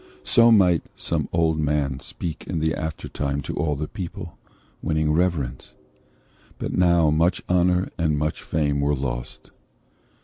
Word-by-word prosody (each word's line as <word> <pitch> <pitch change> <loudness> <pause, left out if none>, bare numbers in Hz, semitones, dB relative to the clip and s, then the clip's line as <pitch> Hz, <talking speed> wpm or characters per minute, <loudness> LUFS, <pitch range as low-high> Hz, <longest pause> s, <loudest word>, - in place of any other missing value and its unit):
So 115 -1 +5
might 90 -6 +4
some - - -2
old 80 -1 +1
man 75 -3 0
speak 80 +4 -6
in 90 - -2
the 80 0 +1
aftertime 75 -3 -3
To - - -5
all 75 -2 0
the 75 +2 -3
people, 90 -4 -7 0.5
winning 80 -1 +1
reverence. 80 -6 -1 0.8
But - - -4
now 85 -3 +4
much 85 +4 +2
honour 90 +1 +2
and 80 -3 +1
much 75 +1 -2
fame 75 -2 0
were 70 +1 +2
lost." 60 -2 -5
80 Hz, 140 wpm, -24 LUFS, 75-85 Hz, 0.8 s, So